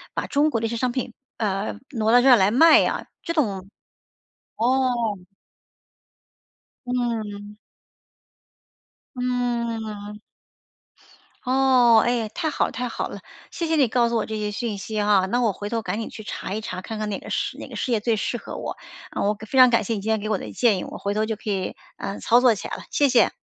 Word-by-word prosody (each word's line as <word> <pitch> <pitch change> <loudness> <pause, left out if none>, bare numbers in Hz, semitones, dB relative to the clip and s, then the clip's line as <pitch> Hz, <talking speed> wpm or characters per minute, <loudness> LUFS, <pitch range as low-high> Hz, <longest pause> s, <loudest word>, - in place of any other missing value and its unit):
把 - - -1
中 290 +2 +2
国 230 - -1
的 - - -1
一 225 - -1
些 235 - -3
商 250 +1 0
品， 245 -1 -4 0.2
呃， 205 -2 -2
挪 225 -4 +1
到 245 0 +7
这 265 - +3
儿 255 - +9
来 190 +1 +4
卖 315 +8 +7
啊， - - -2 0.2
这 335 - -3
种 195 - -1 0.9
哦。 255 +3 +2 2.0
嗯。 215 -4 -3 1.6
嗯。 235 -4 -3 1.3
哦， 255 -3 +5
唉， 240 -2 0
太 315 +7 -2
好 - - +1
了 - - -5
太 250 -1 -3
好 - - -3
了， - - -8 0.3
谢 335 - -3
谢 320 - +1
你 275 -5 +4
告 235 0 +2
诉 235 - -1
我 220 - 0
这 220 -1 -4
些 210 -1 -2
讯 210 0 -3
息 215 +2 -3
哈， 205 -2 +3
那 245 +5 0
我 225 -4 +2
回 205 +2 -6
头 230 -1 -1
赶 200 +3 -3
紧 225 - -4
去 215 - -9
查 195 - -5
一 215 - -2
查， 185 -3 -5
看 220 +2 -6
看 215 0 -2
哪 200 - -3
个 - - -11
事 - - -2
哪 - - -8
个 - - -10
事 255 - -2
业 225 - +2
最 225 +1 +1
适 240 +3 -2
合 - - -8
我， - - -5 0.4
我 205 +1 0
非 265 - -2
常 255 -1 +9
感 230 -2 +2
谢 230 - -2
你 205 - -3
今 220 - -4
天 220 -1 +2
给 215 - -5
我 210 - +1
的 - - -8
建 230 -5 +2
议， - - -4
我 - - -7
回 200 - -2
头 215 +1 0
就 220 0 -2
可 215 0 -7
以， 190 -2 -2 0.2
呃， 195 - -5
操 240 +2 +4
作 250 -2 +6
起 - - -6
来 - - -5
了， - - -9
谢 285 - +3
谢。 240 -6 +4
225 Hz, 230 characters per minute, -23 LUFS, 210-245 Hz, 2.0 s, 儿